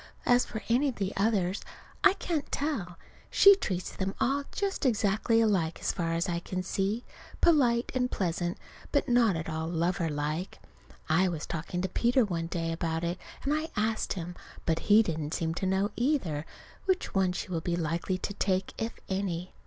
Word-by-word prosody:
As 245 0 +4
for 220 - -6
any 250 +5 +3
of 255 - -5
the 195 0 -2
others 195 -2 +1 0.4
I 395 - +7
can't 335 -6 -3
tell. 225 - -2 0.3
She 400 0 +8
treats 185 - -3
them 195 +1 -2
all 280 +2 +1
just 400 -1 -2
exactly 225 -2 +2
alike, 185 -7 +2
as - - 0
far 165 -2 -1
as 170 +3 0
I 170 -1 -1
can 185 +1 -4
see. 195 +5 -1 0.4
Polite 250 -8 +4
and 250 -1 +1
pleasant, 175 -3 -1 0.3
but 285 - +2
not 240 -6 +4
at 160 0 -3
all 160 0 -2
lover 170 0 0
like. 150 +5 -3 0.5
I 165 +4 +4
was 165 -4 -3
talking 170 +2 -3
to - - +1
Peter 240 +6 +3
one 165 -4 -2
day 165 -1 -2
about 165 0 -2
it, 175 +2 -2 0.2
and 280 - +1
I 310 +1 -1
asked 215 +1 0
him. 175 -2 -5 0.3
But 165 -1 +1
he 215 +2 +8
didn't 155 -5 -3
seem 165 -1 -1
to 190 +3 -2
know, 190 +2 +1
either, 215 - 0 0.4
which 375 -1 0
one 190 -2 +3
she 180 - -4
will 170 -3 -1
be 170 +1 -1
likely 170 +3 -1
to 200 - -4
take, 190 -1 0
if 225 +1 -2
any. 185 -2 -2
190 Hz, 185 wpm, -29 LUFS, 170-235 Hz, 0.5 s, She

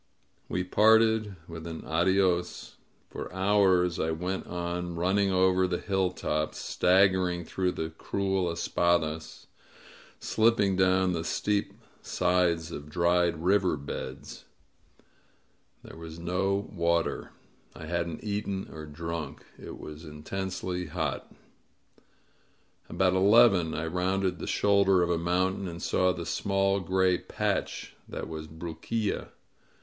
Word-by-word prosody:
We 90 - -1
parted 110 +1 +4
with 85 -1 -8
an 80 -1 -7
adios. 90 +2 +1 0.3
For - - -6
hours 95 -2 +3
I 80 - 0
went 90 +4 -3
on, 85 0 -4
running 95 +3 +1
over 95 0 +3
the 90 -1 -1
hilltops, 90 -6 -1
stag 95 +2 +4
gering 90 -2 -1
through 90 +2 -1
the 80 0 -4
cruel 95 +2 -1
espadasy 85 -2 -1 0.7
slipping 110 -4 +2
down 95 0 +3
the 80 -1 -2
steep 105 +4 -1 0.3
sides 90 -2 +1
of 75 -1 -7
dried 85 0 +1
river 95 -3 +3
beds. 70 -1 -7 1.4
There - - -11
was 80 -1 -9
no 95 +4 -1
water. 85 -2 0 0.5
I 80 - -8
hadn't 85 0 -3
eaten 100 -2 -3
or 80 -1 -8
drunk. 80 -1 -6 0.2
It - - -8
was 75 +1 -9
intensely 90 +3 -4
hot. 80 -3 -3 1.6
About 95 -1 +2
eleven 95 -3 +5
I 80 - -2
rounded 90 +1 -1
the - - -5
shoulder 100 -2 +3
of 85 - 0
a 85 - +1
mountain 95 +3 0
and 85 -1 -6
saw 90 +1 +2
the 85 -2 -5
small 95 +3 +1
gray 95 0 +2
patch - - -3
that - - -5
was 80 -1 -6
Bruquilla. 85 +7 -3
90 Hz, 120 wpm, -28 LUFS, 85-95 Hz, 1.6 s, eleven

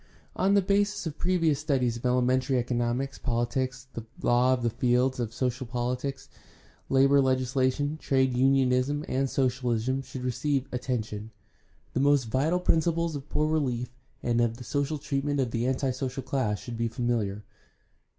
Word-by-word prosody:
On 195 +2 +3
the 200 - +4
basis 200 +1 +1
of 155 -2 -5
previous 165 -5 +2
studies 130 -6 0
of 120 - -2
elementary 125 +1 +2
economics, 120 +2 -1
pohtics, 125 +2 -1
and 115 -1 -7 0.2
law 125 +2 +4
the 120 -2 -1
fields 125 +2 +1
of 115 -3 -2
social 125 +1 -2
pohtics, 125 +3 -3 0.6
labor 135 +1 +5
legislation, 130 +3 +1
trade 130 -3 +1
unionism, 135 +2 +2
and 135 +1 0
socialism 125 -1 0
should 130 -1 -8
receive 130 +2 0
attention. 110 -4 -3 0.6
The - - 0
most 140 0 +4
vital 135 +10 +1
principles 165 -1 +1
of 140 +1 -7
poor 150 - +1
relief 125 -6 -1 0.3
and 120 0 +2
of 115 -1 0
the 125 - -9
social 145 +4 -1
treatment 145 0 -2
of 125 -3 0
the 115 +2 -1
anti 130 0 0
social 130 +1 -4
class 125 -6 -1
should 120 +1 -7
be 115 - +1
familiar. 115 -4 -1
130 Hz, 150 wpm, -28 LUFS, 120-140 Hz, 0.6 s, labor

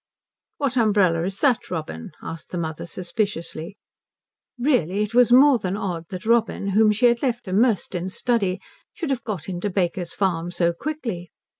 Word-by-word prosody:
"What 275 -3 -1
umbrella 200 -7 +3
is 195 +1 -4
that, 255 -5 +2
Robin?" 155 - -5
asked 165 +2 -7
his 175 - -1
mother 160 0 -4
suspiciously. 180 -1 -4 0.8
Really, 230 - +1
it 210 +2 -5
was 245 0 +5
more 265 0 +7
than 195 -1 -2
odd 175 -5 -3
that 185 +1 -7
Robin, 225 -3 +1
whom 210 +2 +4
she 225 +4 +2
had 235 -1 +4
left 240 -5 -1
immersed 210 +2 +2
in 180 +1 -2
study, 200 -3 0 0.3
should 320 -5 -3
have 250 -3 -2
got 190 -10 -5
into 185 +2 -3
Baker's 180 -2 -1
Farm 175 -4 0
so 170 -1 +1
quickly. 225 - -5
195 Hz, 165 wpm, -23 LUFS, 175-235 Hz, 0.8 s, more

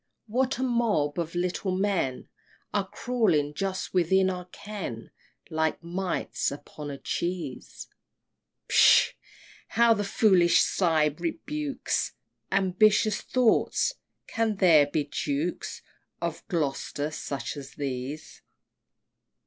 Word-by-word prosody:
what 255 +4 0
a 260 - -2
mob 220 - +1
of 170 0 -3
little 180 +1 -1
men 190 -10 -1 0.5
Are 200 -2 0
crawling 185 -13 +1
just 190 +3 -3
within 190 +1 +3
our 180 -1 -6
ken, 180 - -7 0.4
Like 160 +1 0
mites 180 -2 -2
upon 145 +1 -8
a 140 - -5
cheese! 170 -4 -4 0.8
Pshaw! - - +6 0.5
how 235 0 +4
the 205 -2 -1
foolish 195 -4 +4
sight 155 -5 +2
rebukes 300 -3 -2 0.4
Ambitious 195 +2 +3
thoughts! 255 - +2 0.3
can 225 -1 -1
there 165 -7 +6
be 150 +1 0
Dukes 145 +3 -3 0.4
Of - - -4
Gloster 150 -3 -2
such 135 -5 -4
as 140 -2 -9
these! 140 +2 -5
180 Hz, 105 wpm, -27 LUFS, 150-210 Hz, 0.8 s, Pshaw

